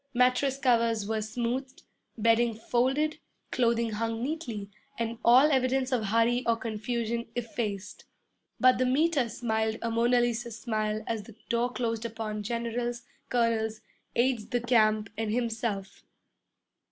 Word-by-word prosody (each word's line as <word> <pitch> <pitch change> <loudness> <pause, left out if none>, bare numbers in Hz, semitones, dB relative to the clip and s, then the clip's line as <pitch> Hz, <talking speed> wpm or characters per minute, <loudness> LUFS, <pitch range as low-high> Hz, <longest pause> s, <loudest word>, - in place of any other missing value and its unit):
Mattress 255 +2 +3
covers 230 -5 +2
were 220 0 -1
smoothed, 245 +4 -3 0.3
bedding 230 +1 +3
folded, 265 +7 0 0.3
clothing 235 -2 +1
hung 225 +2 -2
neatly, 245 -9 -4 0.3
and 230 0 -3
all 260 +6 +7
evidence 260 0 +1
of 240 -4 +1
hurry 230 +4 +2
or 230 - +4
confusion 230 +1 -3
effaced. 220 -4 -4 0.5
But 255 -1 +5
the 255 - +3
Meter 280 -1 +2
smiled 220 -1 -1
a 230 - -1
Mona 240 +2 +3
Lisa 240 0 -1
smile 215 -2 -2
as 225 -2 -2
the 205 +1 -14
door 235 +1 +1
closed 230 -3 -2
upon 220 -2 -4
generals, 235 +2 -3 0.3
colonels, 225 -2 +1 0.3
aides 240 -3 +2
de 245 -1 -1
camp, 215 -3 +3
and 220 -1 -1
himself. 225 -4 -2
235 Hz, 130 wpm, -29 LUFS, 220-245 Hz, 0.5 s, all